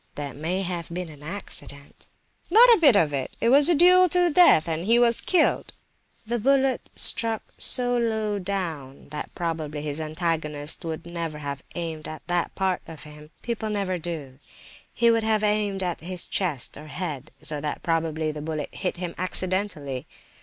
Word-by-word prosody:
"That 145 -3 -6
may 175 +6 -2
have 175 -2 -4
been 175 0 -5
an 150 -2 -13
accident." 150 -4 -6 0.4
"Not 475 +3 +8
a 450 - +3
bit 285 -9 +6
of 160 -7 +3
it; 135 -2 -4
it 230 - +2
was 280 +5 +7
a 345 - +4
duel 365 +3 +6
to 360 - +2
the 350 -1 +3
death, 295 - +6
and 165 0 -2
he 230 +3 +4
was 235 -1 +3
killed." 365 - +1 0.5
"The 235 +2 -2
bullet 270 +2 +1
struck 225 -2 +3
so 245 -1 +3
low 220 -3 -1
down 165 -10 -5
that 150 0 -6
probably 155 -3 -4
his 150 +1 -3
antagonist 155 -2 -2
would 160 -1 -5
never 170 -3 -5
have 140 -2 -6
aimed 165 -3 -4
at 155 - -8
that 175 -1 -1
part 190 -2 0
of 160 -2 -9
him—people 155 +10 -7
never 195 -3 -2
do; 155 -6 -5 0.5
he 235 -1 +3
would 230 -1 +1
have 220 -1 +1
aimed 210 -2 0
at 175 -2 -2
his 180 +1 -4
chest 165 -10 -2
or 150 +1 -11
head; 155 -4 -5
so 150 -2 +2
that 150 -1 -4
probably 160 -2 -1
the 150 0 -7
bullet 155 -1 -5
hit 185 - -3
him 175 -1 -5
accidentally. 185 -8 -1
175 Hz, 175 wpm, -25 LUFS, 155-215 Hz, 0.5 s, Not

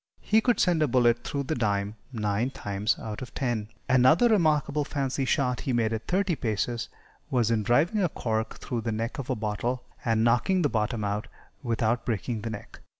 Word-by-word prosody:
He 220 +1 +3
could 245 +1 +2
send 175 -4 +3
a 155 - +4
bullet 120 -2 +3
through 140 -1 -2
the 140 - -2
dime 105 -4 -1 0.2
nine 105 +1 0
times 105 -3 -1
out 110 +1 -6
of 130 - -8
ten. 120 -5 -1 0.2
Another 130 - +5
remarkable 155 -7 +2
fancy 135 -1 -2
shot 130 -2 +1
he 130 - -1
made 115 -2 +1
at 110 0 -4
thirty 185 -1 +1
paces 115 -1 -2 0.4
was 120 -3 +2
in 110 -2 +2
driving 150 - +2
a 180 - +2
cork 110 -5 -2
through 120 -3 -3
the 115 0 -2
neck 115 +4 -3
of 135 - -5
a - - +1
bottle, 110 +4 -2 0.2
and 115 -1 +2
knocking 120 +11 +3
the 145 - +3
bottom 110 -1 -1
out 105 +2 -2 0.3
without 115 -1 0
breaking 115 0 -2
the 115 - -4
neck. 105 -2 -8
120 Hz, 195 wpm, -27 LUFS, 110-140 Hz, 0.4 s, Another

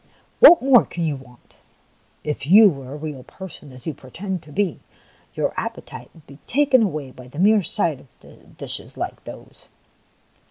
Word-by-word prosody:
What 350 - +9
more 265 -3 +6
can 170 - -5
you 155 -3 -1
want? 125 -2 -17 0.7
If 150 -2 -4
you 205 +5 +8
were 135 -3 -9
a - - -6
real 150 -3 -7
person, 160 -1 -12
as 125 -1 -12
you 160 - -3
pretend 180 +8 -6
to 150 -2 -15
be, 190 0 -1 0.6
your - - -1
appetite - - -7
would 160 - -19
be 140 +1 -15
taken 275 -1 +3
away 155 -10 -2
by 125 -1 -13
the 130 - -14
mere 205 +4 +4
sight 170 -7 -1 0.2
of - - -19
dishes - - -4
like - - -5
those - - -12
160 Hz, 170 wpm, -21 LUFS, 140-205 Hz, 0.7 s, What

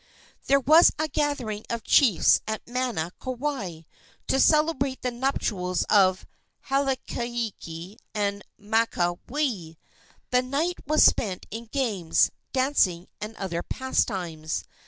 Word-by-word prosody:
There 275 +1 +5
was 310 +6 +6
a 310 - 0
gathering 260 -9 -2
of 235 -1 -3
chiefs 235 - +5
at 220 0 -4
Mana, 240 -9 -2
Kauai, 255 - -4 0.4
to 270 - +1
celebrate 300 -3 +2
the 250 - 0
nuptials 210 -8 -1
of 190 -3 +4 0.4
Hauailiki 235 -9 -3 0.2
and 200 -1 -1 0.2
Makaweli. 205 - -1 0.5
The 250 0 +4
night 290 +8 -1
was 305 +1 +5
spent 190 -6 +2
in 230 +2 -6
games, 215 - +1 0.2
dancing 255 -10 +1
and 215 +1 -6
other 175 -5 -3
pastimes. 175 -12 -2
230 Hz, 110 wpm, -26 LUFS, 185-270 Hz, 0.5 s, was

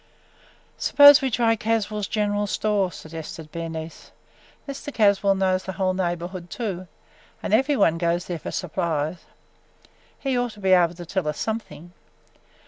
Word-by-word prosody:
"Suppose 285 -1 +8
we 265 - 0
try 230 -1 +2
Caswell's 215 -2 -1
general 205 -1 0
store," 200 -3 0
suggested 160 -1 -9
Bernice. 165 -1 -7 0.6
"Mr. 280 +1 -6
Caswell 200 -4 +3
knows 185 -1 +1
the 190 - -4
whole 185 0 0
neighborhood 175 0 -3
too, 190 -6 -4 0.6
and - - -2
every 270 +6 +3
one 165 -6 +3
goes 170 +1 0
there 175 -2 -4
for - - -6
supplies. 160 -2 -2 1.0
He 270 -2 -1
ought 245 -2 -1
to 210 - -15
be 190 -1 +1
able 175 -2 +4
to 175 0 -9
tell 180 -1 -2
us 150 - -2
something. 215 -6 -5
190 Hz, 145 wpm, -24 LUFS, 170-215 Hz, 1.0 s, Suppose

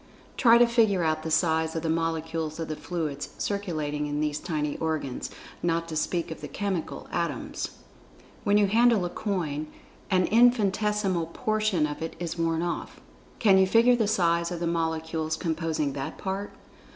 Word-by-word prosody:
Try 235 -1 +6
to 240 - +7
figure 220 -6 +3
out 155 -1 +1
the 160 - -4
size 160 0 +2
of 165 - -2
the - - -1
molecules 160 -1 -2
of 165 - -4
the 155 - -2
fluids 155 -4 -4
circulating 155 -7 -2
in 145 0 -2
these 150 0 -1
tiny 150 -4 -2
organs, 155 -5 -2 0.3
not 165 -1 0
to 160 - -4
speak 165 +2 -1
of 160 - -7
the - - -5
chemical 195 -5 -3
atoms.[Pg 170 -7 -3
69] - - -4 0.7
When 205 0 +4
you 210 - +5
handle 225 -1 +4
a 175 - -4
coin, 155 -8 -2 0.4
an 185 -2 +3
infinitesimal 210 -6 +3
portion 215 -2 0
of 150 0 -5
it 165 - -4
is 170 -1 -4
worn 165 -1 0
off—can 190 +3 -1
you 190 - +5
figure 230 +5 +5
the 225 -3 +1
size 170 -4 +2
of 175 - -3
the 170 - -2
molecules 160 -1 -1
composing 160 -4 -1
that 135 -1 -5
part? 195 +1 -4
170 Hz, 170 wpm, -27 LUFS, 160-200 Hz, 0.7 s, to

